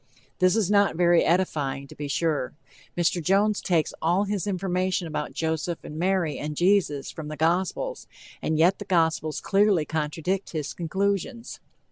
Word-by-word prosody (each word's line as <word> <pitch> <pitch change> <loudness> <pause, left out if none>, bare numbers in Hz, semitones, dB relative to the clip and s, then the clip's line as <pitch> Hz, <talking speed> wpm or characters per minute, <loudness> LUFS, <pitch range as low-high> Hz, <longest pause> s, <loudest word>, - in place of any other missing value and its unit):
This 185 +2 +4
is 210 -4 +1
not 200 -3 +4
very 175 0 +4
edifying, 145 -6 0
to - - -13
be 145 - -5
sure. 145 -3 -1 0.4
Mr. 175 0 +1
Jones 200 +5 +2
takes 165 -4 +1
all 175 +5 +2
his 205 -1 -2
information 185 -1 -1
about 155 -2 -4
Joseph 160 +1 -2
and 155 - -7
Mary 180 -3 0
and 150 0 -5
Jesus 175 -7 +2
from 155 -2 -7
the 155 0 -6
gospels, 185 - -1 0.3
and 160 - 0
yet 175 +5 +4
the - - -6
gospels 160 -3 +1
clearly 195 -5 +3
contradict 160 +5 -2
his 150 -3 -3
conclusions. 200 +7 -2
175 Hz, 155 wpm, -25 LUFS, 155-195 Hz, 0.4 s, This